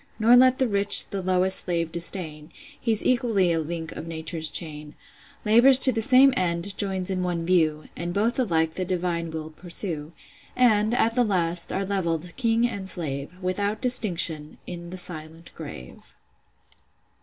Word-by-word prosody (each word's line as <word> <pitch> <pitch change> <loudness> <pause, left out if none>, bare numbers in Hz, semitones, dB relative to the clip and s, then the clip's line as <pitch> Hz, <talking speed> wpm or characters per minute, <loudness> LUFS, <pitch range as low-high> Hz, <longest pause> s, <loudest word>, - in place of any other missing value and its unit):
Nor 230 +2 +4
let 255 +1 +4
the 260 - +1
rich 200 -1 +6
the 195 - -4
lowest 185 +1 0
slave 170 -2 -3
disdain: 165 -3 0 0.3
He's 225 -3 -1
equally 230 -8 +1
a 165 - 0
link 165 +1 -6
of 165 - -9
Nature's 160 -1 -3
chain: 150 -3 -5 0.5
Labours 240 +5 +6
to 260 0 +6
the 225 -2 -3
same 265 +3 +5
end, 180 +1 -2
joins 190 -2 -2
in 185 -1 -3
one 175 -2 -3
view; 160 -4 0
And 175 +1 -5
both 220 +7 -1
alike 160 -9 0
the - - -6
will 180 - -4
divine 170 -3 -4
pursue; 170 -3 -5 0.4
And, 220 -2 +2
at 230 -1 +1
the 245 +1 +1
last, 175 -5 -2
are 195 - -3
levell'd, 180 -3 -4
king 230 -2 0
and 200 -5 -7
slave, 140 -6 -4
Without 200 +3 -3
distinction, 170 -11 +3
in 175 -1 -9
the 185 - -8
silent 165 -1 -5
grave." 60 0 -12
180 Hz, 160 wpm, -23 LUFS, 165-215 Hz, 0.5 s, rich